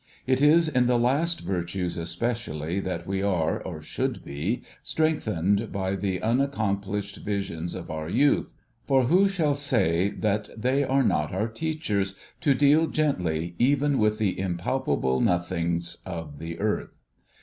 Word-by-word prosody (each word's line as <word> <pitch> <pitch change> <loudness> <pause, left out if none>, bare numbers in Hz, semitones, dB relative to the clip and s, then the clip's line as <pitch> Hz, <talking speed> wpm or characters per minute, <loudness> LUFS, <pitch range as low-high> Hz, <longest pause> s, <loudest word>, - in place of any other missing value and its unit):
It 130 +1 +2
is 160 +3 +6
in 125 -5 +2
the 125 -1 +3
last 150 +8 +1
virtues 90 -1 -2
especially, 90 -2 -2
that 90 -3 -3
we 95 +1 -2
are, 90 -5 0
or 80 -4 -7
should - - -3
be, 80 - -2 0.2
strengthened 110 - 0
by 95 -1 -1
the 95 -2 -2
unaccomplished 105 -5 -1
visions 95 -5 -3
of 90 -3 -7
our 80 0 -4
youth; 140 +9 +2 0.3
for, 135 0 +4
who 180 +10 +4
shall 165 -7 +1
say 105 - +1
that 105 0 -1
they 130 +5 +2
are 135 0 +2
not 75 -9 +1
our 105 +4 0
teachers 110 - -2 0.2
to 140 -2 +3
deal 145 +4 +4
gently 90 - 0
even 140 +2 +3
with 105 0 +2
the 105 -5 0
impalpable 85 - 0
nothings 85 -1 0
of 80 -5 -7
the 85 0 -6
earth 105 0 -2
100 Hz, 145 wpm, -26 LUFS, 85-135 Hz, 0.3 s, is